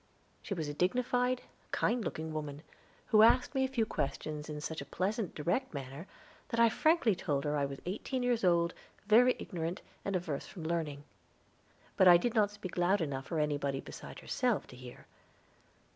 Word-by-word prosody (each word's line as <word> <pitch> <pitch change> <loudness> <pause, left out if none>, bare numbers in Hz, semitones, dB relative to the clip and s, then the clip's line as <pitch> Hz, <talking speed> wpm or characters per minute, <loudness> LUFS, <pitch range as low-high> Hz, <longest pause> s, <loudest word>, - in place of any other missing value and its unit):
She 200 - -4
was 160 -4 -3
a 145 - -3
dignified, 250 +8 +1 0.3
kind 240 -1 +1
looking 160 -3 -4
woman, 150 -1 -5 0.5
who 215 -2 +6
asked 245 +4 +5
me 265 -1 +2
a - - +2
few 250 -4 0
questions 150 -2 -3
in 150 -1 -4
such 160 +1 -4
a - - -7
pleasant, 200 +1 -2
direct 175 - -1
manner 140 +6 -6 0.4
that 230 - -1
I 230 0 +7
frankly 310 -2 +3
told 145 -6 -1
her 150 0 0
I 145 -1 +1
was 140 0 -8
eighteen 245 +7 -3
years 245 -3 +1
old, 170 -1 +3 0.3
very 240 +4 +6
ignorant, 170 0 -4 0.2
and 200 - -2
averse 160 -6 -3
from 175 - -9
learning; 160 -3 -2 0.9
but 190 - +6
I 175 -1 +10
did 230 +6 -1
not 210 -3 +3
speak 205 -4 -7
loud 185 +3 +3
enough 140 -5 -3
for 165 - -2
anybody 145 -2 0
beside - - -9
herself 245 -5 0
to - - -11
hear. 125 -1 -11
175 Hz, 180 wpm, -32 LUFS, 150-225 Hz, 0.9 s, I